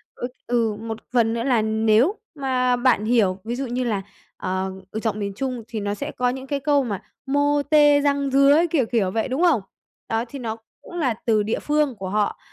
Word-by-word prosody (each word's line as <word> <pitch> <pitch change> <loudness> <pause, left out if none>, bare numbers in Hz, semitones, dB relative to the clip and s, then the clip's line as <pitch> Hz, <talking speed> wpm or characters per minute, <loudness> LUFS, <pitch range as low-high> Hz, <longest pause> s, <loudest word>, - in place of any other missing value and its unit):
ừ, 245 - -4 0.2
ừ, 230 -3 +1
một 225 0 -5 0.2
phần 230 -2 +3
nữa 230 0 -2
là 245 -4 +2
nếu 220 - +3 0.2
mà 255 -3 +1
bạn 245 -4 +2
hiểu, 215 -5 +2
ví 235 +2 -3
dụ 270 +2 -3
như 250 +1 -2
là 215 -5 -1 0.4
ờ, 190 +1 -2 0.2
ừ, 220 - -3
giọng 220 -2 -2
miền 200 -1 -3
Trung 250 0 -3
thì 225 -2 -4
nó 205 0 -2
sẽ 205 - -5
có 250 0 0
những 260 +1 -5
cái 285 +1 -1
câu 285 0 +2
mà 205 -6 -4 0.2
mô 285 +1 +2
tê, 295 -1 +6
răng 280 -1 +1
rứa, 275 +4 +5
kiểu, 280 -7 +2
kiểu, 215 -5 0
vậy, 220 +1 -1
đúng 260 +4 -2
không? 315 - +4 0.5
Đó, 225 +1 0
thì 275 +4 -8
nó 225 -3 -4 0.2
cũng - - -13
là 255 -6 +1
từ 215 -3 +3
địa 220 +2 -1
phương 295 -3 +1
của 190 -2 -6
họ, 210 +1 0
240 Hz, 220 wpm, -23 LUFS, 220-275 Hz, 0.5 s, tê